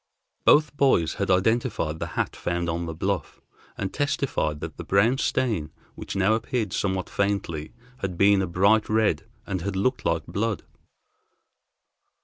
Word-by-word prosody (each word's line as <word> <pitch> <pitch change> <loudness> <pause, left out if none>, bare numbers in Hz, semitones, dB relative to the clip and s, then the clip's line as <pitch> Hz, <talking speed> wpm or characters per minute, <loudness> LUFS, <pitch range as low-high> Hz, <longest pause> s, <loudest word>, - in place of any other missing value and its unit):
Both 150 0 +5
boys 130 - +3
had 100 - 0
identified 95 -4 +1
the - - -3
hat - - -1
found 85 0 -2
on 85 +1 -3
the 80 - -4
bluff, - - -2 0.4
and 95 -1 -3
testified 140 - -1
that - - -7
the - - -6
brown 110 +7 +3
stain, 110 -13 0 0.2
which - - -7
now 95 +2 +3
appeared 110 -2 -1
somewhat 95 -2 -1
faintly, 100 -6 -2 0.3
had 90 -6 -3
been 100 +1 +5
a 95 - -1
bright 100 +5 +3
red, 110 -1 +1 0.2
and 95 -3 -3
had 100 +2 -3
looked 125 +7 0
like 80 -2 0
blood. 105 +4 -2
100 Hz, 150 wpm, -25 LUFS, 85-110 Hz, 0.4 s, Both